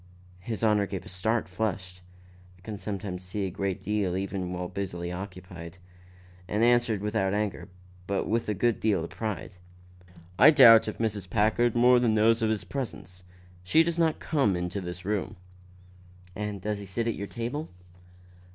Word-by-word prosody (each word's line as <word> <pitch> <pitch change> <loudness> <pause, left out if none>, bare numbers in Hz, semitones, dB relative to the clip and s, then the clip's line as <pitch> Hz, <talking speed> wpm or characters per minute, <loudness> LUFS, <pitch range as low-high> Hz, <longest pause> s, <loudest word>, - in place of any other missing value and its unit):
His 110 +4 -5
Honor 105 -2 +3
gave 95 -2 -6
a - - -10
start, 105 +3 -1
flushed 90 -2 -4 0.6
(I - - -23
can 105 +1 -7
sometimes 95 -3 -5
see 95 +2 -3
a 95 - -3
great 100 0 -3
deal 100 -4 0
even 95 -2 -3
while 90 0 -3
very - - -16
busily 85 -1 -6
occupied) 90 -2 -8 0.7
and 105 +2 0
answered 120 -3 +3
without 105 -2 0
anger, 105 -1 -3 0.4
but 100 -1 -1
with 115 0 -1
a 105 - 0
good 115 +4 +1
deal 100 -6 +1
of 85 - -7
pride: 100 0 -4 0.9
"I - - +9
doubt 120 -8 +8
if 110 - -4
Mrs. 105 -4 -2
Packard 110 +4 +2
more 125 +1 +6
than 115 -3 +2
knows 115 +2 +4
of 110 - +2
his 110 -3 -1
presence. 95 -6 -6 0.4
She 155 - +4
does 170 0 -2
not 160 -2 +2
come 100 - 0
to 100 +2 -4
this 90 0 -7
room." 105 -1 -2 1.0
"And 105 0 -3
he - - -8
does 105 +1 -2
not 100 - -9
sit 115 +5 -2
at 115 - +1
your 100 - -6
table?" 125 +9 -4
105 Hz, 180 wpm, -28 LUFS, 90-115 Hz, 1.0 s, I